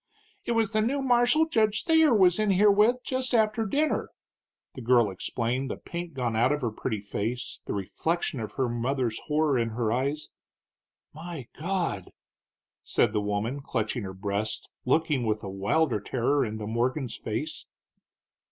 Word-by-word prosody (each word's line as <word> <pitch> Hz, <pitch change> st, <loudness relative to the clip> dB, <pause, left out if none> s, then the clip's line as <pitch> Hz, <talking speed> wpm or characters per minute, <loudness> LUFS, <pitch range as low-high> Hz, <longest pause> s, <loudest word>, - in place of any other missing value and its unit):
"It 235 Hz, -, 0 dB
was 225 Hz, -2 st, +1 dB
the 215 Hz, -1 st, +2 dB
new 270 Hz, +5 st, 0 dB
marshal 245 Hz, +5 st, +4 dB
Judge 215 Hz, -8 st, +2 dB
Thayer 320 Hz, -2 st, +5 dB
was 190 Hz, -4 st, +4 dB
in 215 Hz, -1 st, +2 dB
here 200 Hz, +2 st, +5 dB
with 225 Hz, +5 st, +3 dB
just 255 Hz, -1 st, -1 dB
after 220 Hz, 0 st, +2 dB
dinner," 300 Hz, +8 st, 0 dB, 0.6 s
the 130 Hz, -, -8 dB
girl 120 Hz, -3 st, +4 dB
explained, 120 Hz, +7 st, -2 dB
the -, -, -4 dB
pink 170 Hz, -3 st, -7 dB
gone 120 Hz, -4 st, -1 dB
out 120 Hz, +4 st, +3 dB
of 150 Hz, 0 st, 0 dB
her 120 Hz, -3 st, -1 dB
pretty 110 Hz, 0 st, -3 dB
face, 115 Hz, +4 st, -4 dB
the -, -, -3 dB
reflection 145 Hz, -, -2 dB
of 110 Hz, -2 st, -5 dB
her 130 Hz, -2 st, 0 dB
mother's 120 Hz, 0 st, -1 dB
horror 150 Hz, -3 st, +2 dB
in 115 Hz, -1 st, 0 dB
her 110 Hz, -1 st, -1 dB
eyes. 140 Hz, +5 st, -1 dB, 0.8 s
"My 160 Hz, -3 st, -7 dB
God!" 170 Hz, -, -2 dB, 0.7 s
said 105 Hz, -, +1 dB
the 105 Hz, -, +1 dB
woman, 105 Hz, +6 st, -2 dB
clutching 115 Hz, -2 st, -2 dB
her 95 Hz, -2 st, -6 dB
breast, 100 Hz, +2 st, -3 dB
looking 150 Hz, -1 st, +2 dB
with 110 Hz, -1 st, -1 dB
a 100 Hz, -, -5 dB
wilder 105 Hz, +7 st, +1 dB
terror 130 Hz, +7 st, 0 dB
into 110 Hz, -1 st, -4 dB
Morgan's 120 Hz, +4 st, -1 dB
face. -, -, -5 dB
135 Hz, 160 wpm, -27 LUFS, -, 0.8 s, Thayer